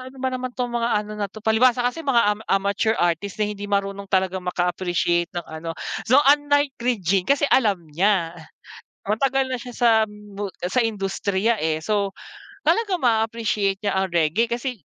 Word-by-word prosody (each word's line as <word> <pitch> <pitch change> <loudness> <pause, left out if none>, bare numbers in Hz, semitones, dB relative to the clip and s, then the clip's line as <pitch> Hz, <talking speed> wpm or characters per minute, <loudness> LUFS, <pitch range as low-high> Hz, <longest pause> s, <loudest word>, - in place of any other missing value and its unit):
ano 265 - -16
ba 260 0 -2
naman 255 0 -3
tong 245 -1 -2
mga 235 -1 0 0.2
ano 210 - -8
na 210 -1 -3
to." 215 +2 -13
Palibhasa 240 +2 +3
kasi 250 +7 -1
mga 270 -6 +3
ama 210 +1 0
amateur 200 +3 +1
artist 175 +3 -1
na 215 - +1
hindi 205 0 -7
marunong 200 0 -2
talagang 190 -1 0
maka 180 0 -1
appreciate 175 -1 0
ng 175 - -3
ano. 160 +1 -7 0.3
So, 275 +5 +5
unlike 290 0 +3
Regine, 195 -6 0
kasi 280 +1 +3
alam 205 -9 +2
niya, 170 +2 +1 0.7
matagal 265 +6 +1
na 255 - -2
siya 245 0 -9
sa 240 -1 +4 0.2
mu 205 -1 -7 0.2
sa 190 +8 +1
industriya, 205 0 -1
eh. 155 0 0
So, 205 +1 0 0.5
talaga 440 -4 +2
ma-appreciate 220 -4 0
niya 200 -2 0
ang 190 - +1
reggae 170 +8 +2
kasi 240 +1 -3
210 Hz, 175 wpm, -23 LUFS, 190-245 Hz, 0.7 s, So